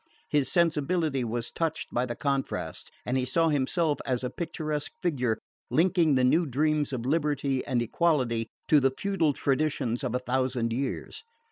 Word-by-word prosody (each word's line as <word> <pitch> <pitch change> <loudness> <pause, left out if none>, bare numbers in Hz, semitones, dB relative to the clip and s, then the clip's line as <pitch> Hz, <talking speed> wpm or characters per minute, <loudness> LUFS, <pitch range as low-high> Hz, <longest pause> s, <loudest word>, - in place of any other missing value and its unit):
His 145 -3 +2
sensibility 160 -4 +1
was 115 0 -3
touched 165 -1 -2
by 125 +1 +1
the 120 - -4
contrast, 140 +1 -2 0.2
and 130 +2 0
he - - 0
saw 165 +6 +2
himself 150 +2 +1
as 125 -1 -1
a 125 - -2
picturesque 155 -3 -3
figure 125 -10 +1 0.3
linking 170 -3 +3
the 130 - +3
new 160 +7 +3
dreams 150 +2 +1
of 125 -3 -3
liberty 145 -2 0
and 125 -4 +1
equality 125 -4 +1 0.2
to 150 - +6
the 135 -1 +3
feudal 195 -7 +1
traditions 135 -4 0
of 125 -2 -1
a 125 - -2
thousand 125 -2 0
years. 135 - -3
140 Hz, 160 wpm, -28 LUFS, 125-155 Hz, 0.3 s, to